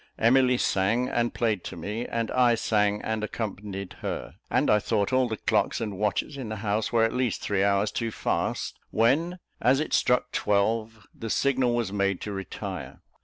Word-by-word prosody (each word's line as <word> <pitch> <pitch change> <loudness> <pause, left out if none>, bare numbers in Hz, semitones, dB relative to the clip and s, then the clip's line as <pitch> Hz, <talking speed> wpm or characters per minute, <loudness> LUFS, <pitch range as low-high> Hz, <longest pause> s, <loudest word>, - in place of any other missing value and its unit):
Emily 125 +2 +4
sang 110 +5 +1
and 120 0 0
played 110 -6 0
to - - -6
me, 105 +8 -4
and 115 -1 -2
I 125 -2 +4
sang 105 -2 +1
and 110 -1 -2
accompanied 100 -3 -5
her; - - -4 0.2
and - - +2
I 105 - +5
thought 105 +1 0
all 130 -1 +3
the 110 -2 -3
clocks - - +1
and 105 -3 -3
watches 105 +7 -1
in 125 -5 -5
the 110 - -3
house 105 +1 0
were 115 -2 +3
at 115 - +2
least 125 -3 -1
three 100 -2 +1
hours 100 +1 +2
too 115 -1 -2
fast, - - -2
when, 150 +11 +2 0.2
as 130 +4 +4
it 155 - -2
struck 125 0 +2
twelve, 110 +1 0
the 115 - -6
signal 130 -1 +2
was 115 -5 -1
made 100 -2 +1
to 105 - -4
retire. 95 -2 -6
110 Hz, 185 wpm, -27 LUFS, 105-120 Hz, 0.2 s, I